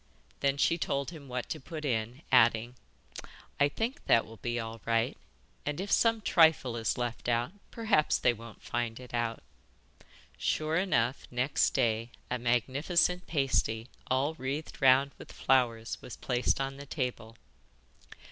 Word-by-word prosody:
Then 140 0 +1
she 165 +4 +2
told 140 0 -1
him 150 -5 -11
what 125 -1 -4
to - - -3
put 155 +2 -7
in, 120 +2 -2
adding: 120 -1 +4 0.9
'I 145 - +5
think 230 - -3
that 115 - +5
will 115 0 -12
be 120 +1 -2
all 115 -1 -6
right, 115 0 +1 0.5
and 150 +1 -3
if 195 +2 -4
some 230 -1 +3
trifle 160 - +4
is 115 -1 -1
left 120 0 -3
out 120 +4 +1 0.2
perhaps 215 -9 +2
they 120 - +3
won't 115 -1 -12
find 120 -1 -2
it 125 -1 -12
out.' 120 -1 -1 1.0
Sure 155 +1 0
enough, 135 -9 +1
next 125 +3 +1
day 115 0 +1 0.2
a 125 - 0
magnificent 140 - +1
pasty 130 -6 0 0.2
all 135 +4 +1
wreathed 145 +1 -5
round 135 +1 +5
with - - -11
flowers 120 -4 +1
was 125 - -9
placed 125 0 0
on 135 0 -3
the 140 0 -9
table. 125 -5 -4
130 Hz, 150 wpm, -30 LUFS, 115-150 Hz, 1.0 s, I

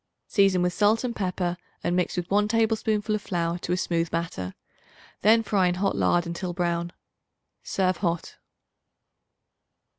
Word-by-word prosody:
Season 195 -3 +3
with 180 0 +1
salt 215 +4 +3
and 240 -2 -2
pepper 180 -2 -1 0.3
and 175 - 0
mix 180 0 0
with 175 -1 -2
1 205 +1 +3
tablespoonful 220 -1 +1
of 210 - -1
flour 170 -2 -2
to 175 - -4
a 180 - +2
smooth 170 -2 0
batter; 130 - -3 0.7
then 225 +2 +5
fry 200 -4 +2
in 175 - +1
hot 195 +2 0
lard 175 0 +2
until 170 +1 -4
brown. 170 -1 -1 0.7
Serve 185 -2 0
hot. 170 -3 -2
180 Hz, 150 wpm, -26 LUFS, 175-205 Hz, 0.7 s, then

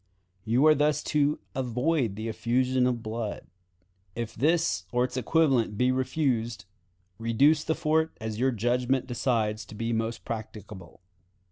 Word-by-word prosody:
You 120 +6 +3
are 155 - +8
thus 150 0 +1
to 150 0 +2 0.2
avoid 125 -1 0
the 110 +2 -5
effusion 125 +3 +1
of 120 -2 -2
blood. 110 -1 -4 0.7
If 115 -1 -4
this 155 - +1
or 125 0 +2
its 125 0 -3
equivalent 130 -5 +2
be 125 +2 +3
refused, 125 -5 -1 0.5
reduce 135 +7 +3
the 160 - 0
fort 160 +1 0
as 110 -1 -5
your 130 +2 +3
judgment 125 +2 0
decides 115 -4 -1
to 105 - -12
be 115 +2 -2
most 115 +1 -3
practicable. 105 -5 -8
125 Hz, 140 wpm, -27 LUFS, 110-135 Hz, 0.7 s, are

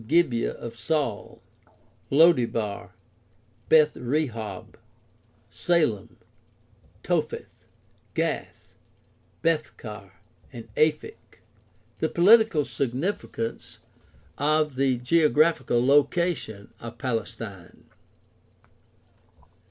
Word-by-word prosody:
Gibeah 140 -6 +2
of 115 0 -9
Saul, 140 - -2 0.7
Lo 165 +5 +7
debar, 115 -6 -3 0.7
Beth 155 -1 +5
rehob, 120 -5 -3 0.8
Salem, 155 - 0 0.9
Topheth, - - -2 0.6
Gath, - - -3 0.8
Bethcar, 115 - -3 0.4
and 115 -2 -11
Aphek. 155 - -1 0.6
The - - 0
political 195 -4 +5
significance 130 - -4 0.6
of 150 +1 +2
the 130 -1 +1
geographical 150 -2 +2
location 140 - +1
of 115 0 -9
Palestine. 115 -6 -5
135 Hz, 65 wpm, -25 LUFS, 115-155 Hz, 0.9 s, Lo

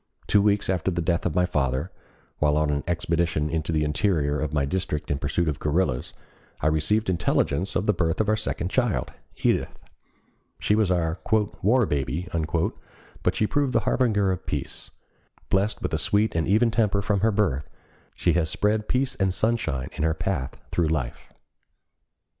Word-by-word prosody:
Two 100 - +4
weeks 105 0 +2
after 95 -1 0
the 85 -2 -2
death 85 +1 0
of 85 - -4
my 90 0 +3
father, 70 0 -1 0.5
while 75 0 +3
on 75 -1 +2
an 70 0 -1
expedition 85 -3 0
into 80 0 -1
the 80 -1 +1
interior 75 -2 +1
of 75 -2 -2
my 75 -2 +1
district 75 -2 -2
in 70 - 0
pursuit 80 +4 0
of 75 -3 -1
guerrillas, 75 -4 0 0.5
I - - -4
received 105 +8 +1
intelligence 90 0 0
of 95 - +1
the 105 - +3
birth 80 -4 0
of 110 - +1
our 110 - +3
second 95 -4 -3
child, 120 -2 0 0.3
Edith. - - +1 0.8
She - - +1
was 105 -3 +3
our 85 -2 0 0.4
"war 115 +5 +4
baby," 75 +3 -2 0.9
but - - +1
she 110 - +2
proved 140 +3 0
the - - +3
harbinger 105 -6 +2
of 90 - -5
peace. - - -4 0.6
Blessed 100 +2 +1
with - - -2
a - - +1
sweet 105 +2 +1
and 80 -1 0
even 110 +4 +3
temper 105 -3 +1
from 100 0 +1
her 110 +3 +3
birth, 90 -10 0 0.5
she - - +2
has 85 -3 +1
spread 105 +1 0
peace 130 +1 +1
and 95 -6 0
sunshine 110 - -1
in - - -5
her 80 0 +2
path 80 -5 -3
through 85 -2 +1
life. 70 -6 -3
90 Hz, 175 wpm, -25 LUFS, 75-105 Hz, 0.9 s, Two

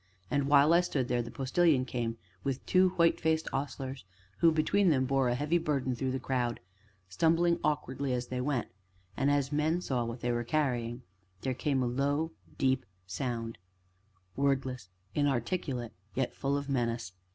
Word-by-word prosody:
And, 140 -1 +1
while 145 +2 +6
I 170 - +6
stood 135 -8 -1
there, 120 -1 +2
the 115 - -6
Postilion 135 +2 +2
came 120 -2 -3 0.3
with 135 -1 -2
two 185 0 +4
white 170 -2 +3
faced 160 0 +1
ostlers, 135 -2 -4 0.4
who, 165 - +6
between 180 +5 +3
them, 130 -4 +3
bore 135 -1 +2
a 120 - +1
heavy 150 +6 +1
burden 140 -5 0
through 130 +2 -2
the 130 +1 -1
crowd, 125 -2 -1 0.5
stumbling 165 - +2
awkwardly 140 -3 -1
as 125 -1 -1
they 125 0 -2
went; 130 -3 -1 0.5
and, 135 +1 +1
as 145 -1 +1
men 155 +3 +1
saw 130 -8 -1
that 115 - -3
which 120 - -9
they 120 -1 0
carried, 120 -4 0 0.4
there 130 - -1
came 135 0 0
a - - +1
low, 140 +5 0 0.3
deep 130 -1 +2 0.2
sound 115 +4 -4 0.8
wordless, 130 -6 0 0.2
inarticulate, 135 -2 -1 0.2
yet 130 -1 0
full 140 0 0
of 140 0 -4
menace. 115 -7 -1
135 Hz, 165 wpm, -31 LUFS, 125-150 Hz, 0.8 s, while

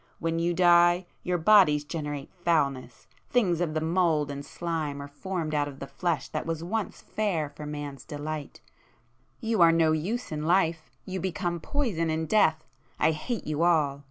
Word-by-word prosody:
When 165 0 -1
you 170 +1 0
die, 175 0 +5 0.2
your 180 0 0
bodies 165 -5 +5
generate 145 -2 -5
foulness,—things 165 - -1
of 160 -3 -1
the 155 - 0
mould 160 -3 +1
and 140 0 -6
slime 155 -2 -3
are 140 - -6
formed 160 +1 -4
out 145 -1 +1
of 140 -2 -8
the 140 - -6
flesh 155 +2 -2
that - - -4
was 165 0 -3
once 215 +4 -3
fair 175 -9 -1
for 150 +1 -8
man's 145 -3 -6
delight,—you 145 - -6
are 165 -1 +8
no 165 -1 +3
use 190 +11 -2
in 150 -1 -3
life—you 170 +2 -1
become 175 -1 -2
poison 195 - -1
in 160 0 -1
death,—I 155 -6 +1
hate 205 +9 -4
you 155 0 -2
all! 155 -5 +3
160 Hz, 155 wpm, -27 LUFS, 145-175 Hz, 0.2 s, are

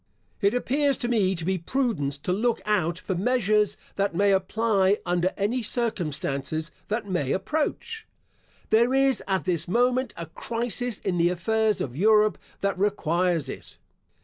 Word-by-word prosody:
It 200 +3 +3
appears 275 +2 +1
to 240 - -2
me 200 -6 +2
to 165 -2 -3
be 190 0 0
prudence 165 - -1
to 180 +5 -2
look 230 +4 +1
out 180 -6 +1
for 190 - -4
measures 210 0 +1 0.2
that 200 -3 0
may 200 +2 +3
apply 195 +1 +2
under 175 +1 +1
any 220 +6 0
circumstances 155 - -2 0.2
that 215 0 -2
may 175 -8 -1
approach. 310 - -2 0.6
There 235 +4 +4
is, 270 -1 +3
at 190 -1 0
this 170 -3 0
moment, 245 +4 +1
a 170 - -5
crisis 235 +6 -2
in 180 -3 -1
the 170 +1 +4
affairs 215 +4 +1
of 125 -2 -4
Europe 215 +4 +4 0.2
that 200 -2 -1
requires 175 -5 +1
it. - - -9
200 Hz, 150 wpm, -26 LUFS, 175-235 Hz, 0.6 s, There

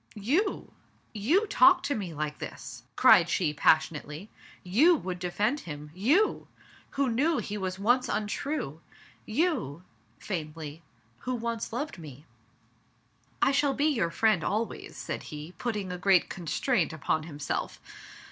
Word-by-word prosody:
"You! 290 - 0 0.4
you 285 - +2
talk 370 -3 +5
to 285 - 0
me 200 -9 -4
like 150 -1 -4
this?" - - -8
cried - - +6
she 160 -5 +1
pas 155 +1 +5
sionately. 155 +5 -8 0.2
" - - -24 0.2
You 340 +4 +7
would 185 - -4
defend 205 +10 0
him! 150 - -8
You! 280 - +2 0.5
who 275 -1 +2
knew 280 +7 +2
he 210 -3 -3
was 190 -2 -3
once 245 +6 +2
untrue? 210 - -3 0.5
You" 220 - -1 0.2
— - - -37
faintly 155 -4 -6 0.2
— 115 +1 -37
"who 255 0 -3
once 230 -1 -3
loved 255 - -4
me?" 145 -2 -11 1.2
"I - - +5
shall 275 0 +2
be 285 - +1
your 230 - +2
friend 215 -2 +2
always," 220 +2 -3
said - - -4
he, 150 +1 -7
putting 210 -6 -2
a 180 - -5
great 190 -1 +4
constraint 175 - 0
upon 155 +1 0
himself. 150 -2 -4
205 Hz, 145 wpm, -28 LUFS, 160-260 Hz, 1.2 s, You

